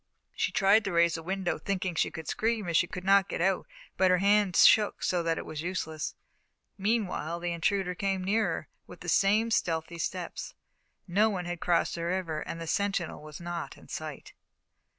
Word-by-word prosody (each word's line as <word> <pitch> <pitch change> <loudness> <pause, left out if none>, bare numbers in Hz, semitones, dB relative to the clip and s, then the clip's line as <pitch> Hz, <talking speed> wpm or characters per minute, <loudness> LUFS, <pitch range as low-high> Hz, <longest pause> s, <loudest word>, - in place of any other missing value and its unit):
She - - 0
tried 210 0 +4
to 195 - -1
raise 170 -1 +4
the 165 - -3
window, 185 +1 -2
thinking 190 -2 -2
that 160 - -3
she - - +2
could 160 -1 -8
scream 220 -3 -1
if 170 - -1
she 175 - +4
could 180 - -7
not 195 0 +4
get - - -3
out, 190 +2 +1 0.3
but 185 - +4
her 180 - +5
hands 200 -1 +4
shook 210 -2 +5
so 180 -1 +1
that 165 -1 0
it - - -5
was 155 -1 -5
useless. 160 -3 -3 0.6
Meanwhile 195 -6 -1
the 175 0 -2
intruder 180 +2 0
came 195 +1 -1
nearer, 215 +4 0 0.2
with - - -12
the - - -4
same 215 +4 +3
stealthy 165 -4 -1
steps. 180 +1 -4 0.5
No 205 +5 +3
one 185 -4 -3
had 175 -1 -4
crossed 170 -1 +2
the 170 0 -3
river 170 -3 -1
and 165 - -6
the 165 - -5
sentinel 195 -3 -1
was 150 0 -10
not 175 -1 -5
in - - -17
sight. - - -7
180 Hz, 195 wpm, -29 LUFS, 170-200 Hz, 0.6 s, her